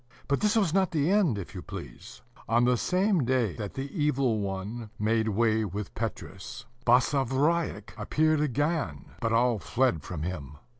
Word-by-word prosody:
But 140 - +1
this 210 +1 +2
was 195 -8 +2
not 190 -1 +3
the 160 -1 +1
end, 190 - +3
if 95 - -7
you - - -6
please. - - -9 0.3
On 120 +2 +4
the 125 0 +4
same 185 - +2
day 125 -5 +1
that 105 -3 -5
the 135 +1 -3
Evil 140 - +1
One 100 +3 -4
made 110 +1 +1
way 110 +1 +2
with 100 0 -5
Petrus, 105 -3 -6 0.2
Basavriuk 135 +6 +2
appeared 155 0 +2
again; 145 - -1
but 115 - -1
all 120 -1 +3
fled 120 -7 +1
from 80 -4 -5
him. 75 -4 -5
120 Hz, 160 wpm, -28 LUFS, 105-150 Hz, 0.3 s, On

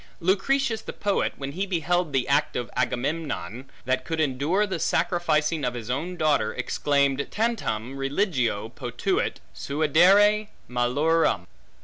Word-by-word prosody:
Lucretius 225 +7 +1
the - - -7
poet, 200 -1 0
when 135 0 -5
he 190 +6 -3
beheld 175 -2 0
the 135 -2 0
act 145 +2 +1
of 120 - -3
Agamemnon, 130 - -2 0.2
that 130 +1 0
could 160 +4 -3
endure 155 +8 +1
the 190 -4 -4
sacrificing 160 -2 +1
of 125 0 -1
his 120 0 -5
own 170 +8 -3
daughter, 145 -9 +1
exclaimed: 140 -1 0
Tantum 185 - -2
Religio 135 - -1
potuit 120 0 -2 0.2
suadere 180 - +4 0.2
malorum. 125 - +1
150 Hz, 125 wpm, -25 LUFS, 125-180 Hz, 0.2 s, suadere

